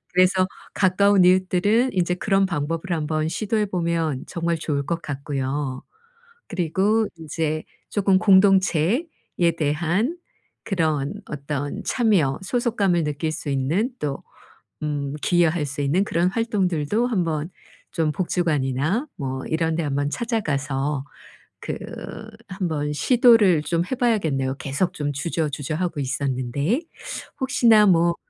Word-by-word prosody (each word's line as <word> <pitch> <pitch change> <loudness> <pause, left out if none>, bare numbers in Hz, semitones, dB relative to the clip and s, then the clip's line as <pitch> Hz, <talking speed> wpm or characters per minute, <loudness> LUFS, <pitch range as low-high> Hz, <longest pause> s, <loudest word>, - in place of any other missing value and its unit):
그래서 185 +1 +4 0.3
가까운 195 0 +4
이웃들은 185 +7 +3
이제 180 -1 +1
그런 195 +1 +2
방법을 165 -1 -2
한번 155 -1 -1
시도해 215 +3 -1
보면 165 -6 -1
정말 170 -1 -1
좋을 145 -3 -2
것 170 +1 -2
같고요. 140 -1 -3 0.7
그리고 195 +4 +1
인제 155 0 -3 0.3
쪼금 195 -2 +3
공동체에 195 - +4 0.5
대한 170 - 0 0.5
그런 155 -5 0
어떤 145 -1 -4
참여 185 - +2
소속감을 200 -7 +1
느낄 150 +2 -2
수 155 - -6
있는 145 - 0
또 140 -2 -3 0.6
음 145 -2 -2
기여할 175 -3 +2
수 145 0 -5
있는 160 +8 +2
그런 175 -2 +1
활동들도 200 -1 0
한번 165 -8 -1 0.4
좀 160 -3 0
복지관이나 165 - 0
뭐 130 -2 -4
이런 160 0 0
데 165 - -1
한번 145 0 -1
찾아가서 145 - -1 0.6
그 - - -4 0.7
한번 160 -6 -2
시도를 210 - +5
좀 170 +2 0
해 - - +1
봐야겠네요, 160 - 0
계속 140 +7 -1
좀 145 -1 -3
주저주저하고 155 +2 -2
있었는데. 140 - -1 0.6
혹시나 235 -5 +5
뭐 170 -2 +4
165 Hz, 260 characters per minute, -23 LUFS, 145-195 Hz, 0.7 s, 시도를